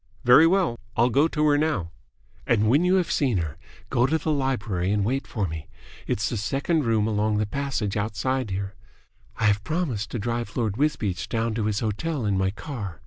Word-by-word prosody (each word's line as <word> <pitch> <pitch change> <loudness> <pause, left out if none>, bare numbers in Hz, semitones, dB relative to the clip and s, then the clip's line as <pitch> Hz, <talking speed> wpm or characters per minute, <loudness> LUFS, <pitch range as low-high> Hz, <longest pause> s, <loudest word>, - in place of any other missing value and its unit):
"Very 135 +7 +7
well. 175 -9 +1 0.2
I'll 120 +2 +4
go 140 +6 +4
to 155 -2 0
her 145 0 +3
now." 145 - -1 0.6
"And 110 -2 +3
when 140 +9 +4
you 180 +1 +3
have 180 -3 +1
seen 130 -8 +1
her, 80 -4 -3 0.4
go 120 +2 +3
to 160 +4 +2
the 160 - -2
library 105 -10 -1
and 105 -1 +1
wait 135 +5 -1
for 105 -5 -2
me. 80 -2 -6 0.4
It's 110 +2 0
the 120 - -2
second 140 - 0
room 110 -2 +2
along 105 0 +1
the 105 - +1
passage 125 -4 -2
outside 115 +4 -1
here. 95 +1 -3 0.6
I - - -3
have 105 0 +3
promised 135 - -2
to - - -4
drive 115 0 -3
Lord 110 -5 0
Wisbeach 105 - -1
down 115 0 -1
to 110 -1 -1
his 105 -1 0
hotel 120 +5 -2
in 100 -1 +1
my 95 0 +1
car. 105 - -6
115 Hz, 200 wpm, -25 LUFS, 105-140 Hz, 0.6 s, Very